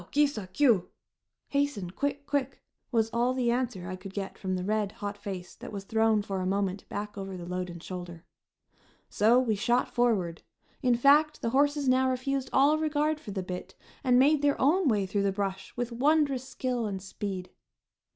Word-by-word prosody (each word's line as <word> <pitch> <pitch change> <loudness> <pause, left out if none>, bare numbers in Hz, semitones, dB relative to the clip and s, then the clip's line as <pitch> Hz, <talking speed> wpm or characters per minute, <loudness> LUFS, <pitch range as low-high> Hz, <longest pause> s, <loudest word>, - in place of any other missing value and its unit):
Ki 295 +1 +4
sa! 220 -10 -4
Kiu!" 225 -2 +3 0.6
(Hasten! 280 -11 -1
Quick! 285 +6 -2
Quick!) 275 -2 -1 0.3
was 225 -2 +1
all 240 +2 +1
the 245 -2 +1
answer 235 -7 -2
I 185 - -4
could 190 +1 -10
get 195 -1 -4
from 185 -1 -3
the 180 - -3
red, 210 0 0
hot 205 0 -5
face 195 -3 -7
that - - -10
was 200 -2 -5
thrown 220 0 +2
for 195 -1 -3
a - - -2
moment 195 0 -1
back 205 0 -5
over 195 -1 -5
the 175 - -7
load 180 +1 -3
and 170 -1 -9
shoulder. 175 -2 -7 0.9
So 230 +4 +5
we 245 -4 +1
shot 240 +5 +1
forward. 205 -9 +1 0.4
In 250 -3 +3
fact, 295 +5 +4
the 230 - 0
horses 285 +1 +2
now 260 0 +4
refused 260 +1 -1
all 290 +3 +4
regard 305 0 +1
for 260 - -10
the 190 -2 -3
bit, 180 +1 -6 0.3
and 250 -2 +4
made 285 +3 +5
their 285 -1 +2
own 320 +6 +3
way 210 -5 +2
through 200 +2 -1
the 200 0 +2
brush 195 -1 -3
with 245 0 -2
wondrous 275 0 +2
skill 245 -3 -2
and 195 -2 -3
speed. 190 -1 -5
225 Hz, 190 wpm, -29 LUFS, 195-270 Hz, 0.9 s, So